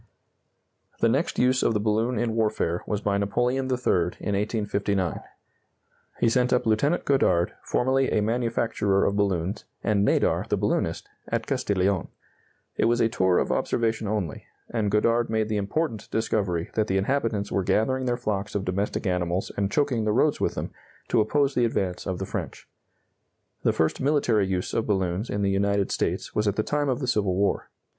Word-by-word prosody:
The -, -, +3 dB
next -, -, 0 dB
use 130 Hz, +1 st, +3 dB
of 115 Hz, -, +2 dB
the -, -, +2 dB
balloon 110 Hz, +3 st, 0 dB
in 120 Hz, -2 st, 0 dB
warfare 105 Hz, -6 st, 0 dB
was 105 Hz, -1 st, -1 dB
by 100 Hz, -1 st, 0 dB
Napoleon 120 Hz, +6 st, 0 dB
III, 90 Hz, -9 st, +1 dB
in 100 Hz, -, -2 dB
1859. 100 Hz, -3 st, -1 dB, 1.0 s
He -, -, +3 dB
sent 125 Hz, +2 st, +2 dB
up 125 Hz, -, +2 dB
Lieutenant 140 Hz, +10 st, +1 dB
Godard, 90 Hz, -11 st, +2 dB
formerly 130 Hz, +1 st, +1 dB
a -, -, +2 dB
manufacturer 115 Hz, -3 st, +1 dB
of 100 Hz, -, +1 dB
balloons, 100 Hz, -1 st, -1 dB, 0.2 s
and 105 Hz, -2 st, +2 dB
Nadar, -, -, +2 dB
the -, -, +1 dB
balloonist, -, -, -1 dB, 0.2 s
at -, -, -2 dB
Castiglione. 95 Hz, -2 st, 0 dB, 0.7 s
It -, -, +2 dB
was 120 Hz, +1 st, +2 dB
a 115 Hz, -, +3 dB
tour 95 Hz, -6 st, +2 dB
of -, -, +1 dB
observation 115 Hz, -2 st, 0 dB
only, 100 Hz, -7 st, -3 dB, 0.2 s
and 110 Hz, -4 st, 0 dB
Godard 115 Hz, +3 st, +2 dB
made 110 Hz, -1 st, 0 dB
the 110 Hz, -, 0 dB
important 110 Hz, +4 st, -2 dB
discovery 100 Hz, -6 st, -1 dB
that 110 Hz, -1 st, +1 dB
the 95 Hz, -, +1 dB
inhabitants 105 Hz, -2 st, 0 dB
were 100 Hz, -, +1 dB
gathering 130 Hz, +7 st, +1 dB
their 120 Hz, -1 st, 0 dB
flocks 105 Hz, -5 st, -3 dB
of 100 Hz, -1 st, -1 dB
domestic 100 Hz, +4 st, -2 dB
animals 90 Hz, 0 st, -1 dB
and 100 Hz, -1 st, 0 dB
choking 140 Hz, -6 st, +1 dB
the 105 Hz, -, +2 dB
roads 145 Hz, +5 st, +2 dB
with -, -, 0 dB
them, -, -, -4 dB, 0.4 s
to -, -, +3 dB
oppose 140 Hz, +6 st, +1 dB
the 125 Hz, -, +2 dB
advance 95 Hz, -6 st, -2 dB
of 95 Hz, -1 st, -2 dB
the 95 Hz, -, -4 dB
French. -, -, -6 dB, 0.9 s
The -, -, +3 dB
first 80 Hz, -1 st, 0 dB
military 125 Hz, -8 st, +2 dB
use 90 Hz, -1 st, -2 dB
of 115 Hz, -, 0 dB
balloons 95 Hz, +1 st, -1 dB
in 100 Hz, 0 st, -1 dB
the 100 Hz, -, +2 dB
United 100 Hz, 0 st, +1 dB
States -, -, -2 dB
was 105 Hz, 0 st, 0 dB
at 100 Hz, -, +1 dB
the 110 Hz, -, 0 dB
time 145 Hz, +2 st, 0 dB
of 130 Hz, +1 st, -1 dB
the 130 Hz, -, -2 dB
Civil 105 Hz, -6 st, +1 dB
War. 100 Hz, +1 st, 0 dB
105 Hz, 180 wpm, -25 LUFS, 100-120 Hz, 1.0 s, The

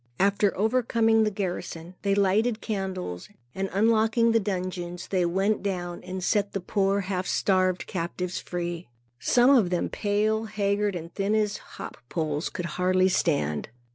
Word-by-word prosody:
After 200 Hz, +1 st, +2 dB
overcoming 225 Hz, 0 st, +3 dB
the -, -, +2 dB
garrison, 180 Hz, -4 st, -4 dB
they 200 Hz, -1 st, +1 dB
lighted 210 Hz, +4 st, +2 dB
candles, 190 Hz, -, -4 dB, 0.2 s
and 195 Hz, 0 st, -2 dB
unlocking 225 Hz, +3 st, +3 dB
the 225 Hz, -, +4 dB
dungeons, 180 Hz, -3 st, -4 dB
went 190 Hz, +3 st, +1 dB
down 175 Hz, -3 st, -3 dB
and 185 Hz, 0 st, -5 dB
set 205 Hz, +1 st, +1 dB
the 195 Hz, -, -1 dB
poor 195 Hz, +1 st, +1 dB
half 185 Hz, -1 st, -3 dB
starved 185 Hz, -2 st, +1 dB
captives 180 Hz, +1 st, -3 dB
free. 175 Hz, -1 st, -4 dB, 0.3 s
Some 245 Hz, -, +4 dB
of 235 Hz, -10 st, +5 dB
them 175 Hz, -1 st, 0 dB
pale, 215 Hz, +1 st, 0 dB
haggard 200 Hz, -1 st, 0 dB
and 170 Hz, 0 st, -7 dB
thin 200 Hz, +2 st, 0 dB
as 210 Hz, -1 st, +1 dB
hop -, -, -10 dB
poles, 155 Hz, -2 st, -1 dB
could 175 Hz, -, -5 dB
hardly 185 Hz, +3 st, +2 dB
stand. 110 Hz, -, 0 dB
195 Hz, 145 wpm, -26 LUFS, 180-210 Hz, 0.3 s, of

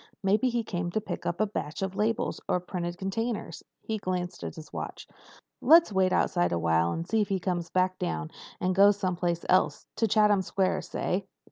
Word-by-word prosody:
Maybe 210 Hz, +7 st, +3 dB
he 235 Hz, -1 st, -1 dB
came 175 Hz, -4 st, -3 dB
to -, -, +2 dB
pick 215 Hz, -, -5 dB
up 170 Hz, -, -2 dB
a 215 Hz, -, +3 dB
batch 195 Hz, -4 st, -4 dB
of 190 Hz, 0 st, -3 dB
labels 220 Hz, +2 st, -1 dB
or 180 Hz, -, +2 dB
printed 175 Hz, -1 st, -4 dB
containers." 215 Hz, +4 st, -3 dB, 0.2 s
He 220 Hz, -1 st, -3 dB
glanced 180 Hz, -2 st, -3 dB
at -, -, -5 dB
his 160 Hz, -1 st, -11 dB
watch. -, -, -6 dB, 0.6 s
"Let's 325 Hz, -7 st, +6 dB
wait 190 Hz, -1 st, +3 dB
outside 85 Hz, -, +2 dB
awhile 85 Hz, 0 st, +2 dB
and 165 Hz, +1 st, -4 dB
see 225 Hz, -1 st, +2 dB
if 205 Hz, -, -1 dB
he 195 Hz, -1 st, 0 dB
comes 175 Hz, -2 st, -2 dB
back 185 Hz, 0 st, +1 dB
down 80 Hz, -, -3 dB, 0.3 s
and 185 Hz, +1 st, +1 dB
goes 200 Hz, +2 st, +6 dB
some 185 Hz, -3 st, -1 dB
place 170 Hz, -1 st, -1 dB
else—to 185 Hz, +4 st, +1 dB
Chatham 210 Hz, -2 st, +4 dB
Square, 190 Hz, 0 st, 0 dB
say." 190 Hz, +1 st, -2 dB
185 Hz, 195 wpm, -28 LUFS, 175-210 Hz, 0.6 s, Let's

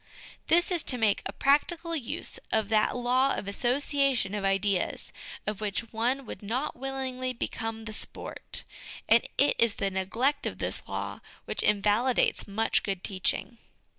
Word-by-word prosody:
This 345 Hz, +3 st, +4 dB
is 345 Hz, -3 st, +2 dB
to 250 Hz, -, 0 dB
make 220 Hz, -3 st, +3 dB
a -, -, -5 dB
practical 330 Hz, +4 st, +2 dB
use 265 Hz, -7 st, -4 dB
of 220 Hz, -2 st, +1 dB
that 215 Hz, +1 st, +3 dB
law 255 Hz, +2 st, +3 dB
of 200 Hz, -, -4 dB
asso 240 Hz, +5 st, +1 dB
ciation 275 Hz, -8 st, +1 dB
of 205 Hz, -, -3 dB
ideas 195 Hz, -1 st, 0 dB, 0.3 s
of 210 Hz, -1 st, -3 dB
which 210 Hz, +2 st, -2 dB
one 250 Hz, +5 st, 0 dB
would -, -, -8 dB
not 245 Hz, +8 st, -2 dB
willingly 260 Hz, -1 st, -3 dB
become 225 Hz, -1 st, -4 dB
the 215 Hz, -, -5 dB
sport; -, -, -4 dB, 0.4 s
and 230 Hz, +1 st, +6 dB
it 285 Hz, -, +4 dB
is 230 Hz, -3 st, +4 dB
the 195 Hz, -1 st, -1 dB
neglect 225 Hz, +10 st, 0 dB
of -, -, -4 dB
this -, -, -2 dB
law -, -, -4 dB, 0.3 s
which -, -, 0 dB
invalidates 210 Hz, +5 st, +2 dB
much 220 Hz, +3 st, +1 dB
good 195 Hz, -2 st, -3 dB
teaching. 200 Hz, +4 st, -1 dB
230 Hz, 160 wpm, -29 LUFS, 205-270 Hz, 0.4 s, and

